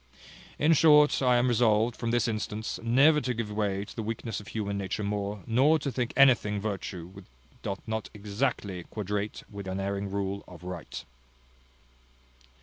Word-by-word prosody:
In 155 +3 +4
short 150 -2 +6
I 125 -2 +4
am 120 +1 +3
resolved, 115 -1 +3
from 115 - -3
this 120 +1 +2
instance, 110 0 -3
never 140 +7 +5
to 125 -3 -2
give 110 -2 -3
way 100 -1 -1
to - - -12
the 115 - -3
weakness 110 0 -4
of 105 - -12
human 100 -2 -3
nature 100 +1 -3
more, 100 -1 -3
nor 135 +7 +4
to 140 -2 -3
think 125 -1 -2
anything 120 -7 +5
virtue 100 -4 -4
which 95 0 -13 0.4
doth 100 - -4
not 110 -1 -3
exactly 105 -2 -2
quadrate 105 +2 -4
with 100 -2 -8
the 95 - -3
unerring 100 +1 -2
rule 100 0 -3
of 90 -1 -13
right." 90 -2 -7
105 Hz, 165 wpm, -28 LUFS, 100-120 Hz, 0.4 s, short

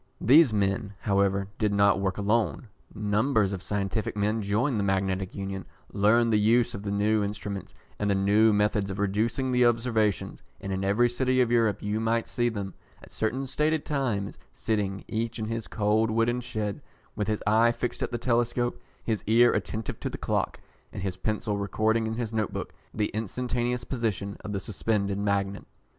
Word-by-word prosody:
These 140 +3 +6
men, 100 -1 -1
however, 100 -1 +1
did 105 -2 +2
not 100 -1 +4
work 95 -1 -1
alone. 105 +1 0 0.3
Numbers 105 0 +1
of 95 - -4
scientific 100 +2 -2
men 105 +2 +1
joined 110 +5 0
the - - 0
Magnetic 95 -1 -1
Union, 95 -1 -4 0.3
learned 110 +3 +3
the 105 - +4
use 115 +3 +3
of 100 - -5
the 100 - -4
new 105 +1 +2
instruments 100 -1 -5 0.2
and 105 - 0
the 100 - +3
new 105 +3 +4
methods 105 -1 +1
of 95 - -4
reducing 110 +6 0
the 125 0 +3
observations; 115 -3 0 0.2
and 95 - -4
in 95 0 -2
every 105 +5 +3
city 130 +1 +1
of 120 -2 +3
Europe 115 -4 +2
you 105 +1 -1
might 115 +1 +1
see 120 -1 0
them, 100 -4 -5 0.3
at - - -14
certain 125 +5 -1
stated 150 +3 0
times, 120 -10 -2
sitting, 100 -3 -2
each 115 +2 -2
in 110 - -3
his 115 0 -4
cold 110 +1 +1
wooden 115 +2 +1
shed, 110 -4 -4 0.3
with 105 - -2
his 110 -1 -1
eye 115 +2 +4
fixed 120 +1 -4
at - - -1
the 120 - -1
telescope, 120 0 0 0.2
his 110 -3 -2
ear 120 +2 +5
attentive 110 0 -3
to - - -3
the - - -6
clock, - - -1 0.3
and 100 - -6
his 95 -2 -2
pencil 105 +1 -2
recording 110 +3 +1
in 110 - -3
his 115 -2 -3
note 110 -2 0
book - - -5 0.2
the 105 -1 -1
instantaneous 120 +3 -2
position 105 -6 -2
of 105 - -7
the 100 - -2
suspended 100 0 -1
magnet. 100 -1 -1
105 Hz, 180 wpm, -27 LUFS, 100-115 Hz, 0.3 s, These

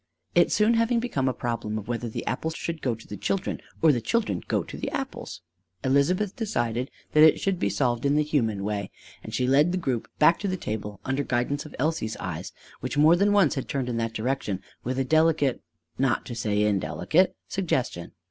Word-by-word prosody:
It - - +4
soon 215 +2 +4
having 230 +1 +2
become 185 - -1
a - - +1
problem 115 -3 -3
of 110 - -6
whether 120 0 -2
the - - -5
apples 160 +8 -2
should 170 -2 -4
go 125 -3 0
to 110 - -15
the 105 - -7
children 195 - -2 0.2
or 160 - +7
the 120 -4 0
children 230 - 0
go - - +1
to - - -9
the - - -3
apples, 265 -3 -5 0.4
Elizabeth 175 +10 +2
decided 125 - -1 0.2
that 155 - +5
it 155 -1 +7
should 195 -3 0
be 100 - +1
solved 120 +4 0
in 140 +1 +2
the 150 - +3
human 115 -10 0
way; 100 -1 -2 0.3
and - - -8
she 125 - 0
led 145 +6 +4
the 185 - 0
group 130 -10 -2
back 165 +3 +5
to 200 - -2
the 185 -1 -1
table 105 - -5
under 130 +2 0
guidance 135 +5 -1
of - - -12
Elsie's 140 -6 -1
eyes, 85 +1 -5 0.3
which 130 +3 -4
more 155 +3 +7
than 200 +3 +3
once 200 -7 +4
had 135 - -4
turned 130 -3 -1
in 120 - -2
that 115 -1 -1
direction 110 -5 -2 0.2
with 130 +1 -2
a 135 - +2
delicate, 155 -2 +3 0.4
not 130 -2 +1
to 120 - -6
say 105 -2 0
indelicate, 100 - +2
suggestion. 130 - -2
135 Hz, 210 wpm, -26 LUFS, 115-165 Hz, 0.4 s, or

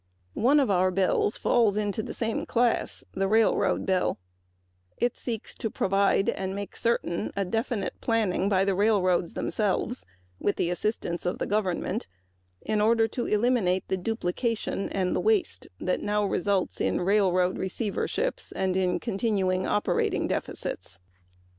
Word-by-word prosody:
Our 255 +6 +3
Railroad 185 -3 +2
Bill 190 +1 +2
falls 220 -1 +2
into 210 0 -1
the - - -7
same 225 -1 -2
class 240 0 +1
because 195 -2 +2 0.8
it 240 0 0
seeks 230 -2 -4
to 225 - -3
provide 195 0 +2
and 190 0 -2
make 200 0 -6
certain 230 -7 -1 0.2
definite 225 -3 -2
planning 210 -4 +1
by 195 -1 +3
the 195 - +2
railroads 185 -4 +2
themselves, 215 +4 -1 0.4
with 205 - 0
the 175 - 0
assistance 180 -2 -2
of 180 - -1
the - - -2
government, 195 -4 -1 0.6
to 225 +2 +2
eliminate 210 -4 +1
the 190 - +1
duplication 220 +2 -2
and 185 -2 0
waste 430 -5 +1
that - - 0
is - - -7
now 210 0 +1
resulting 195 0 0
in - - 0
railroad 185 -1 +2
receiverships 210 - -2
and 185 -1 +1
continuing 195 -4 0
operating 210 - +1
deficits. - - -4
200 Hz, 125 wpm, -27 LUFS, 185-225 Hz, 0.8 s, Our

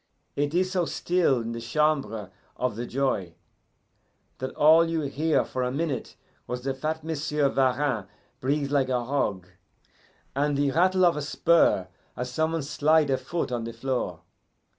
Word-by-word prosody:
It 145 +2 -1
is 185 +1 +2
so 180 -2 +1
still 170 -8 +1
in 115 0 -4
the 115 0 -5
Chamber 115 -7 0 0.3
of 125 -4 -1
the 120 +2 -4
Joy 120 -10 -1 1.0
that 130 - -3
all 160 +2 +6
you 165 -1 0
hear 150 +2 +1
for 130 - -4
a 125 0 0
minute 145 -1 -3 0.3
was 125 0 -4
the 135 0 -1
fat 155 +4 -3
Monsieur 150 -2 0
Varin 130 -5 +1 0.3
breathe 140 +1 -1
like 135 -2 +2
a 125 -2 0
hog, 105 -9 -1 0.9
and 145 +1 +1
the 140 -1 +2
rattle 185 +4 +3
of 170 -3 +3
a - - -2
spur 145 - +3 0.3
as 125 0 -4
some 160 +5 0
one 165 -3 -1
slide 150 +1 +2
a 130 - +2
foot 170 -6 -3
on 120 -2 -2
the 115 - -6
floor. 115 -8 -3
140 Hz, 165 wpm, -26 LUFS, 125-155 Hz, 1.0 s, all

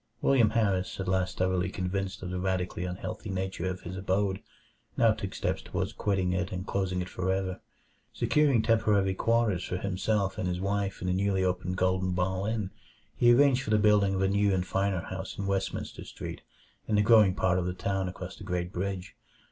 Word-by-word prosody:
William 120 -6 +4
Harris, 100 -6 0
at 95 - -3
last 95 -1 0
thoroughly 95 0 +1
convinced 95 +1 -3
of 90 - -4
the 90 - -2
radically 90 -1 -1
unhealthful 90 +3 -5
nature 95 -1 -3
of 90 0 -5
his 90 +2 -7
abode, 95 0 0 0.6
now - - +5
took - - -4
steps - - -1
toward - - -3
quitting 95 -3 0
it 90 +1 -1
and 90 -1 -4
closing 95 -3 -1
it - - -8
for 95 +1 -2
ever. 95 -1 -2 0.5
Securing 140 -7 +2
temporary 105 -4 +3
quarters 115 -3 +1
for 90 - -3
himself 100 +1 -1
and 90 - -1
his 90 0 -1
wife 100 0 -1
at - - -2
the 90 - +1
newly 95 0 +1
opened 90 0 -1
Golden 95 0 +1
Ball 95 +2 -1
Inn, 110 -4 -2 0.4
he 120 0 +5
arranged 130 +1 +5
for 105 - -6
the 110 - +4
building 105 -2 +4
of 95 - 0
a - - +3
new 100 +1 +2
and 90 -1 0
finer 95 -1 0
house 95 +2 -6
in 100 - -3
Westminster 100 -1 -2
Street, - - -7 0.5
in 110 - +1
the 105 - +4
growing 105 -4 +6
part 95 0 +2
of 90 - -2
the 90 - -1
town 95 0 -1
across 90 +1 -7
the - - -11
Great 90 -1 -3
Bridge. 95 0 -4
95 Hz, 200 wpm, -29 LUFS, 90-100 Hz, 0.6 s, growing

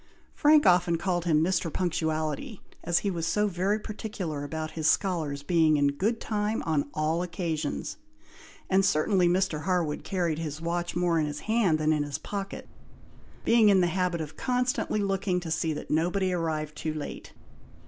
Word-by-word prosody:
Frank 300 0 +5
often 175 -1 +4
called 175 0 -1
him 155 -2 +3
"Mr. 175 -2 0
Punctuality," 165 - -2 0.2
as 170 0 +1
he 200 - +1
was 165 -2 -2
so 210 +5 +2
very 195 +2 0
particular 205 -8 -5
about 155 +2 -4
his 160 -1 -1
scholars 160 -6 0
being 160 -1 +3
in 145 0 +3
good 205 +11 -1
time 210 0 -1
on 150 -3 0
all 155 +2 0
occasions; 170 - -3 0.7
and 190 0 +3
certainly 185 +1 +3
Mr. 175 -3 +1
Harwood 175 -5 0
carried 175 -5 -1
his 155 -2 -4
watch 170 +1 -2
more 175 -2 +2
in 155 - 0
his 145 0 -5
hand 215 -8 +2
than 155 0 +2
in 150 - 0
his 145 -1 -3
pocket, 195 +3 -6 0.8
being 230 -2 +5
in 195 -2 +5
the 180 - +4
habit 180 -1 0
of 155 -1 -7
constantly 250 -4 0
looking 195 -2 0
to 170 -2 -6
see 160 0 0
that 150 - -6
nobody 180 +4 +1
arrived 155 -3 -2
too 155 -1 -3
late. 150 - -7
175 Hz, 170 wpm, -28 LUFS, 155-195 Hz, 0.8 s, Frank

